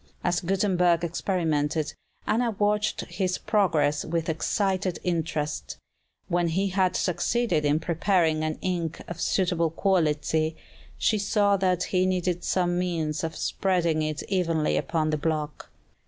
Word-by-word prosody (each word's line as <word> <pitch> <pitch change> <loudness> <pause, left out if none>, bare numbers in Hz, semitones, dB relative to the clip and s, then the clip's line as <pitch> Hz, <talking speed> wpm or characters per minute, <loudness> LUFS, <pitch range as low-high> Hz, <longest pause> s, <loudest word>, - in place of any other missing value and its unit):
As 175 0 +1
Gutenberg 180 -2 +2
experimented, 160 -3 -1 0.3
Anna 235 +3 +1
watched 210 0 +1
his 185 -2 -2
progress 160 -9 +1
with 165 0 -2
excited 185 +2 0
interest. 160 -4 -2 0.5
When 175 0 +1
he 190 +4 0
had 185 -1 +1
succeeded 180 -1 0
in 145 +1 +3
preparing 165 -1 +1
an 155 0 -2
ink 170 -4 -2
of 175 - -6
suitable 175 -3 +1
quality, 160 -3 +1 0.4
she 215 - +2
saw 200 0 +2
that 185 -2 +1
he 185 0 +1
needed 180 -1 -1
some 175 -1 +1
means 160 -4 -1
of 160 0 -3
spreading 170 -5 0
it 155 0 -2
evenly 165 -5 0
upon 155 -2 0
the 155 - +1
block. 155 -1 -3
175 Hz, 130 wpm, -26 LUFS, 160-185 Hz, 0.5 s, in